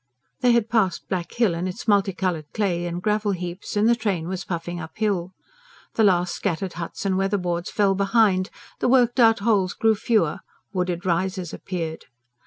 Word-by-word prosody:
They 250 -2 +4
had 235 -2 +2
passed 220 -7 0
Black 180 -3 -2
Hill 230 -7 +2
and 170 +2 -2
its 180 - -8
multicoloured 190 -6 +1
clay 175 -5 0
and 175 +1 -5
gravel 210 -1 +1
heaps, 180 +3 -5
and 210 +2 +4
the 235 - +5
train 200 -8 -2
was 190 +1 -4
puffing 175 0 -4
uphill. 180 +2 -2 0.6
The 225 - +2
last 180 -3 +3
scattered 190 -1 -2
huts 175 +3 -6
and 190 -1 +1
weatherboards 180 -3 -1
fell 200 -2 +2
behind, 195 -1 +2 0.3
the - - +1
worked 245 -1 +3
out 225 -3 +5
holes 200 -4 +2
grew 225 0 +3
fewer, 200 -6 +1 0.3
wooded 180 -1 -2
rises 185 0 -1
appeared. 165 -4 -5
190 Hz, 170 wpm, -24 LUFS, 175-210 Hz, 0.6 s, the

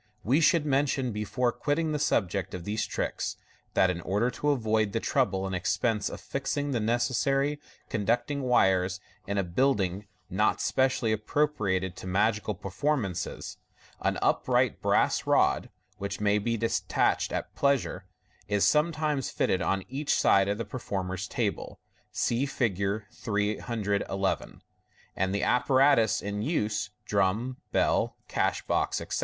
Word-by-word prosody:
We 135 +10 +3
should 165 -1 +4
mention, 135 -2 +1
before 110 +4 0
quitting 155 +5 -1
the 150 - -1
sub 110 -8 +2
ject 95 +1 -4
of 90 - -6
these 105 +3 -2
tricks, - - -3 0.4
that 95 - +4
in 85 -1 -5
order 105 +8 0
to 150 - -1
avoid 110 -6 +1
the 115 - +1
trouble 100 -8 0
and 95 - -3
expense 105 +4 0
of - - -7
fixing 140 +1 -2
the 120 - 0
necessary 135 +5 +1 0.3
con 105 -2 -3
ducting 130 +5 +1
wires 95 -7 +2 0.3
in 100 +1 -2
a 100 - +2
build 115 +8 +2
ing 95 +2 -2 0.2
not 105 +4 +1
specially 130 -4 +1
appro 110 +8 +1
priated 95 -10 -1
to - - -8
magical 105 +2 +1
per 95 - -8
formances, 130 - -2 0.4
an - - 0
upright - - +2
brass - - +2
rod - - +3 0.3
(which 100 0 -4
may 105 0 +2
be 115 +3 -1
detached 115 +1 +1
at - - -4
pleasure) 140 -9 0 0.4
is 105 -1 +2
sometimes 150 -2 +1
fitted 95 - 0
on 95 +1 0
each 140 +3 -1
side 95 0 +4
of 100 +1 0
the 115 - -3
performer's 95 -6 -4
table - - -3 0.3
(see 125 +4 0
Fig. 100 -5 -1
311), 105 -2 -2 0.5
and 95 +1 0
the 100 - -1
apparatus 130 -3 +3
in 105 0 -3
use 105 -7 -1 0.2
(drum, 105 +6 0
bell, - - +1
cash - - 0
box, - - 0
etc.) - - -3
110 Hz, 150 wpm, -28 LUFS, 100-135 Hz, 0.5 s, should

